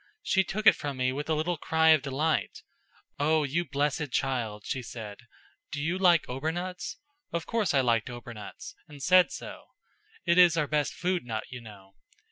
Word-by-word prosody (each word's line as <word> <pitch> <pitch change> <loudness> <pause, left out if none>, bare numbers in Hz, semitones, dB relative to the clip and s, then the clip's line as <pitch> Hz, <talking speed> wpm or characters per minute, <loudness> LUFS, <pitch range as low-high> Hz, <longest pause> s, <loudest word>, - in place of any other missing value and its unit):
She 190 - +3
took 210 +3 -4
it - - +9
from 140 -2 -5
me 130 0 +1
with 145 +4 -5
a 160 - +2
little 165 +3 -1
cry 160 +1 +2
of 155 -2 +6
delight. 150 +3 -1 0.6
'Oh, 155 +2 +3
you 150 +5 0
blessed 145 -1 -1
child,' 120 -7 -1
she 130 - -2
said. 110 -3 -8 0.5
'Do 145 - -4
you 165 +5 -1
like 175 -4 +4
obernuts?' 175 +7 -4 0.3
Of 170 -1 -3
course 210 -10 0
I 135 - +5
liked 120 -2 +1
obernuts, 120 +4 -9
and 145 -3 -11
said 185 0 +5
so. - - -8 0.6
It 170 +1 +4
is 175 -2 +7
our 155 - +2
best 150 0 -1
food 180 0 -1
nut, 110 -2 -4
you 125 -1 -7
know. 100 -3 -14
150 Hz, 180 wpm, -28 LUFS, 125-170 Hz, 0.6 s, it